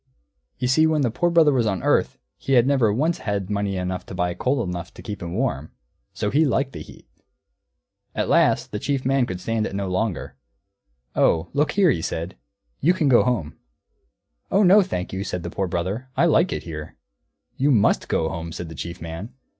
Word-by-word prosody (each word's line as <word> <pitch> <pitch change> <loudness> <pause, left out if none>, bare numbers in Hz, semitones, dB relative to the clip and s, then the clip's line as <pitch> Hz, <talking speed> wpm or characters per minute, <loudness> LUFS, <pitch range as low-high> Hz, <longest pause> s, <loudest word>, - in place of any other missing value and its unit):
You 125 - -1
see 155 +5 +4
when 155 -1 +1
the 120 - +1
Poor 175 +9 +1
Brother 165 -4 +5
was 120 -4 +2
on 95 -4 -2
earth - - +2 0.2
he 135 - -3
had 120 -2 +5
never 130 -6 +3
once 155 +10 0
had 100 -2 -3
money 100 -1 -1
enough 90 0 -3
to - - -7
buy 90 -1 0
coal 125 +7 0
enough 90 -1 -5
to - - -10
keep 105 -2 -6
him 85 0 -5
warm; 95 - -2 0.4
so 105 - -2
he 150 +4 +4
liked 135 -1 0
the - - -7
heat. - - -14 1.1
At - - -1
last - - +3
the 105 - -3
Chief 135 +2 -2
Man 135 -2 +2
could 90 -1 -5
stand 110 +3 -1
it - - -7
no 100 -1 -2
longer. 90 - -2 0.8
"Oh, 80 +1 +2
look 145 +2 +1
here," 190 -5 +4
he 80 - -1
said, 85 +3 -4 0.4
"you 175 +6 +3
can 155 -6 +1
go 120 - +6
home." 115 -12 -2 0.9
"Oh 200 +2 +3
no, 195 +3 +7
thank 95 - -4
you," 95 +1 -2
said 90 -3 -4
the 85 - -5
Poor 95 -2 -2
Brother, 95 +9 -3
"I - - +4
like 170 +2 +3
it - - -3
here." 75 -2 -8 0.6
"You 140 +3 +1
must 115 -8 +3
go 80 - 0
home," 85 0 -5
said 85 0 -6
the - - -8
Chief 85 +1 -7
Man. 85 +10 -7
105 Hz, 210 wpm, -23 LUFS, 90-135 Hz, 1.1 s, no